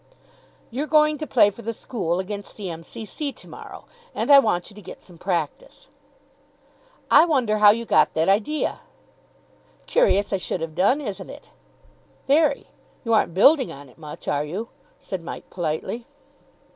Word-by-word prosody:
"You're 275 +6 -3
going 305 -1 +3
to 310 - -4
play 215 -5 +4
for 220 - -12
the 230 0 -4
school 185 -7 -3
against 200 +2 -6
the 195 -4 -5
M.C.C. 220 - -6
to - - -14
morrow, - - -11 0.3
and - - 0
I 280 - +10
want 210 -7 0
you - - -16
to 210 - -11
get - - -11
some 175 -3 -15
practice." 190 - -4 1.2
"I - - +8
wonder 250 -10 +1
how 210 -1 +8
you 230 +3 +2
got - - +3
that 160 +1 +1
idea!" 220 +10 0 1.1
"Curious 210 - +2
I - - +2
should 180 -1 -4
have 165 -1 -4
done, 200 - +2
isn't 205 -8 -6
it?" - - -12 0.7
"Very. 290 +1 +2 0.4
You 230 - +1
aren't 195 -6 +2
building 265 - +5
on 140 0 -11
it 125 - -22
much, 150 -2 -10
are 145 0 0
you?" 190 +10 -5 0.3
said 190 -3 -6
Mike 165 - -8
politely. 175 +8 -3
210 Hz, 165 wpm, -23 LUFS, 175-275 Hz, 1.2 s, I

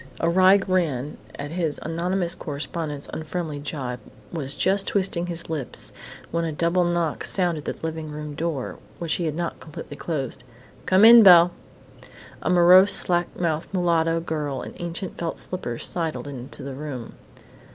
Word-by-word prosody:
A 165 - +1
wry 185 +3 +6
grin 165 -9 -1 0.2
at 145 +1 -6
his 165 -3 -2
anonymous 175 +1 -1
correspondent's 150 -2 -5
unfriendly 155 -1 -4
gibe 135 -4 -5 0.3
was 145 -4 -3
just 195 +1 +2
twisting 185 -3 0
his 170 -1 -4
lips 155 -6 -3 0.4
when 170 0 0
a 165 - -2
double 170 +4 +1
knock 175 -2 -1
sounded 175 -5 0
on - - -4
the - - -8
living 160 -1 -4
room 150 0 -6
door, 160 -3 -3 0.2
which 170 -2 -2
he - - 0
had 155 -2 -2
not 170 0 -3
completely 150 -2 -9
closed. 140 -6 -4 0.4
"Come 190 +3 +6
in, 235 +1 +10
Belle!" 175 -3 +8 0.9
A - - -1
morose, 180 +2 +7
slack 175 -1 +2
mouthed 165 -2 -1
mulatto 165 -2 +2
girl 150 -5 -3
in - - -8
ancient 175 +2 -5
felt 170 -1 -3
slippers 120 -10 -3
sidled 165 -4 -3
into 135 0 -8
the 135 0 -6
room. 130 -4 -7
165 Hz, 160 wpm, -24 LUFS, 150-175 Hz, 0.9 s, in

